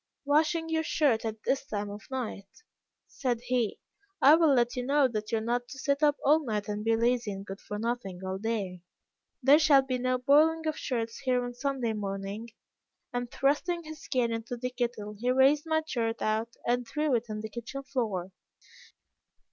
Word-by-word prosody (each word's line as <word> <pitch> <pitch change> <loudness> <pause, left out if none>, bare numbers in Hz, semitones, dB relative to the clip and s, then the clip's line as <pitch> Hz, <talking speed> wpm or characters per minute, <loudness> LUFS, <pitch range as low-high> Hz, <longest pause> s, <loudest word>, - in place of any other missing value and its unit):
'Washing 315 +3 +2
your 320 0 +1
shirt 290 -7 +2
at 220 -1 -4
this 270 - 0
time 205 -5 -3
of 205 +1 -8
night!' 245 - -6 0.4
said 245 -4 -2
he, 245 -3 0 0.4
'I 290 -1 +8
will 320 -4 +5
let 240 +1 +2
you 250 - -2
know 280 +1 +3
that 215 -3 -4
you 225 - +2
are - - -2
not 240 +2 -1
to 270 - -10
sit 280 +1 0
up 295 -1 +4
all 305 +3 +5
night 210 -5 -2
and 210 0 -3
be 225 +1 +3
lazy 235 -1 +1
and 195 0 -7
good 195 0 -8
for 210 - -6
nothing 220 -5 -3
all 190 0 -3
day. 200 -5 -3 0.6
There 280 +4 +7
shall 290 -4 +6
be 255 -1 -2
no 255 0 +1
boiling 310 +5 +4
of 310 -1 0
shirts 230 -6 -3
here 250 -2 +1
on 245 - -5
Sunday 250 -2 -1
morning,' 200 +2 -4 0.6
and 245 0 -2
thrusting 300 +7 0
his 310 -2 -10
cane 245 -3 +1
into 230 +2 -4
the 250 +1 -3
kettle, 240 -4 -3
he 245 +2 0
raised 270 +4 +4
my 315 0 +1
shirt 230 -6 -2
out 220 +2 -1
and 245 0 0
threw 300 -2 0
it 235 0 +1
on 215 0 -4
the 220 - -6
kitchen 240 +5 -6
floor. 215 -9 -2
245 Hz, 195 wpm, -29 LUFS, 220-280 Hz, 0.6 s, I